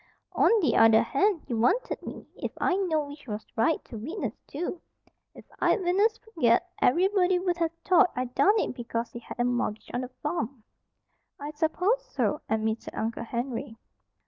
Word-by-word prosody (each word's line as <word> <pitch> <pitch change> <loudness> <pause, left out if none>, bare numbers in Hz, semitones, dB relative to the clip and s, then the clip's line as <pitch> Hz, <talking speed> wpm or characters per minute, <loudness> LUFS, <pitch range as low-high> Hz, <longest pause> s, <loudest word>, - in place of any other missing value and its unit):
"On - - +4
the 320 - +2
other 225 -1 +6
hand, 375 +4 +1
you 235 -4 -2
wanted 455 - +1
me, - - -8
if - - -4
I 370 - +2
knowed 320 -7 0
which 290 -1 -12
was 210 -1 -5
right, 230 +8 +1
to 230 - -8
witness, 320 - -4
too. 340 +3 -4 0.5
If - - -13
I'd - - +3
witnessed 405 +5 +2
for 445 - -20
Ged, 235 0 +6 0.2
ev'rybody 370 +5 +3
wuld 355 -1 0
ha' 335 -1 +1 0.2
thought 365 -1 +5
I 255 - -1
done 390 - +3
it - - -1
because 235 -1 -4
he 235 - -7
had 240 - -10
a - - +3
mortgage 245 -3 -1
on 245 - -1
the 255 - -5
farm." 285 -7 -3 0.8
"I 290 +1 -5
s'pose 360 +10 +1
so," 300 -11 -1
admitted 220 0 -1
Uncle 230 +1 -3
Henry. 240 0 -4
290 Hz, 175 wpm, -27 LUFS, 235-360 Hz, 0.8 s, other